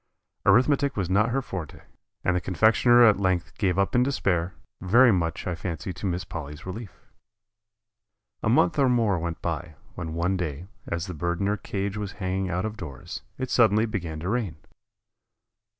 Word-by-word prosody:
Arithmetic 135 Hz, +6 st, +4 dB
was 95 Hz, -3 st, -1 dB
not 105 Hz, +4 st, +3 dB
her 135 Hz, +2 st, 0 dB
forte, 90 Hz, -9 st, -7 dB, 0.4 s
and 90 Hz, -, +2 dB
the 90 Hz, -, 0 dB
confectioner 115 Hz, +7 st, +4 dB
at 105 Hz, -3 st, +5 dB
length 95 Hz, -3 st, 0 dB
gave 95 Hz, -4 st, +1 dB
up 100 Hz, 0 st, +1 dB
in 125 Hz, -, +4 dB
despair, 90 Hz, -, 0 dB, 0.3 s
very 115 Hz, +7 st, +6 dB
much 85 Hz, -4 st, -1 dB
I 90 Hz, -, -1 dB
fancy 85 Hz, 0 st, -5 dB
to 100 Hz, -, -4 dB
Miss 90 Hz, 0 st, -2 dB
Polly's 75 Hz, -2 st, -7 dB
relief. 95 Hz, +2 st, -6 dB, 1.5 s
A -, -, 0 dB
month 100 Hz, -4 st, +3 dB
or 135 Hz, -2 st, +4 dB
more 115 Hz, -7 st, +2 dB
went 85 Hz, 0 st, -5 dB
by, 85 Hz, -1 st, -3 dB, 0.2 s
when 80 Hz, -2 st, -5 dB
one 90 Hz, +3 st, 0 dB
day, 85 Hz, -2 st, -4 dB, 0.2 s
as 85 Hz, 0 st, -2 dB
the 90 Hz, -, -6 dB
bird 85 Hz, +2 st, -2 dB
in 100 Hz, -, 0 dB
her 105 Hz, +1 st, +1 dB
cage 100 Hz, 0 st, -4 dB
was 105 Hz, -2 st, -4 dB
hanging 95 Hz, -1 st, -2 dB
out 90 Hz, +4 st, -1 dB
of 110 Hz, 0 st, -5 dB
doors, 70 Hz, -, -7 dB, 0.2 s
it 130 Hz, -1 st, -4 dB
suddenly 110 Hz, -2 st, +4 dB
began 85 Hz, -8 st, -4 dB
to 90 Hz, -, -3 dB
rain. 110 Hz, -7 st, -1 dB
95 Hz, 180 wpm, -26 LUFS, 85-110 Hz, 1.5 s, very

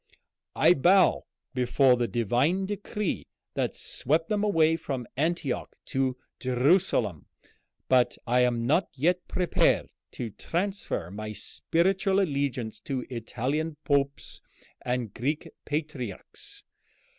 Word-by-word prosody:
I -, -, +6 dB
bow 180 Hz, +5 st, +4 dB, 0.3 s
before 125 Hz, +1 st, +4 dB
the 120 Hz, -1 st, 0 dB
divine 125 Hz, -, +1 dB
decree 205 Hz, -1 st, -3 dB, 0.3 s
that -, -, -1 dB
swept 160 Hz, +5 st, -1 dB
them 210 Hz, -1 st, +1 dB
away 165 Hz, -6 st, +4 dB
from 135 Hz, -6 st, -4 dB
Antioch 155 Hz, -1 st, -1 dB, 0.2 s
to 130 Hz, -1 st, +1 dB, 0.2 s
Jerusalem, 125 Hz, -, +2 dB, 0.6 s
but 125 Hz, -1 st, +3 dB
I 125 Hz, +1 st, +3 dB
am 120 Hz, -2 st, +2 dB
not 165 Hz, +8 st, +2 dB
yet 175 Hz, +6 st, +1 dB
prepared 180 Hz, -1 st, +2 dB, 0.2 s
to 115 Hz, -3 st, -4 dB
transfer 170 Hz, -, -3 dB
my 105 Hz, +1 st, -5 dB
spiritual 190 Hz, -, +1 dB
allegiance 140 Hz, -, -1 dB
to 130 Hz, -3 st, -3 dB
Italian 135 Hz, +7 st, -2 dB
popes 140 Hz, -1 st, 0 dB, 0.4 s
and 125 Hz, -4 st, -2 dB
Greek 145 Hz, +6 st, -2 dB, 0.2 s
patriarchs. 145 Hz, -, -5 dB
140 Hz, 110 wpm, -28 LUFS, 125-170 Hz, 0.6 s, I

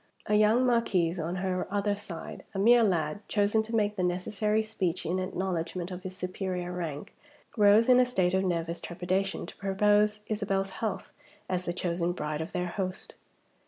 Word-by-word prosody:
A 210 Hz, -, -1 dB
young 215 Hz, +4 st, +4 dB
marquis, 190 Hz, -8 st, +2 dB
on 170 Hz, +3 st, -3 dB
her 185 Hz, 0 st, -1 dB
other 205 Hz, 0 st, 0 dB
side 195 Hz, -5 st, -8 dB
a -, -, -1 dB
mere 235 Hz, +5 st, +6 dB
lad, 170 Hz, -5 st, +1 dB
chosen 210 Hz, +1 st, +2 dB
to 225 Hz, +1 st, -4 dB
make 210 Hz, -1 st, +1 dB
the -, -, 0 dB
necessary 210 Hz, +4 st, 0 dB
speech 190 Hz, -5 st, -2 dB
in 180 Hz, +3 st, 0 dB
acknowledgment 185 Hz, -1 st, -3 dB
of 180 Hz, 0 st, -6 dB
his 185 Hz, 0 st, -7 dB
superior 180 Hz, -1 st, -3 dB
rank 165 Hz, -5 st, -5 dB, 0.4 s
rose, 210 Hz, +1 st, +6 dB
in 250 Hz, -1 st, +7 dB
a 250 Hz, -, +5 dB
state 185 Hz, -7 st, +1 dB
of 190 Hz, 0 st, +2 dB
nervous 170 Hz, -2 st, -1 dB
trepidation, 185 Hz, +3 st, -2 dB
to -, -, -11 dB
propose 210 Hz, +2 st, +2 dB
Isabel's 195 Hz, -2 st, -1 dB
health 195 Hz, -2 st, -4 dB, 0.4 s
as 180 Hz, 0 st, -2 dB
the -, -, -1 dB
chosen 175 Hz, -1 st, -1 dB
bride 150 Hz, -2 st, -3 dB
of 160 Hz, -, -5 dB
their 180 Hz, 0 st, -2 dB
host. 185 Hz, +1 st, -4 dB
190 Hz, 175 wpm, -29 LUFS, 180-210 Hz, 0.4 s, in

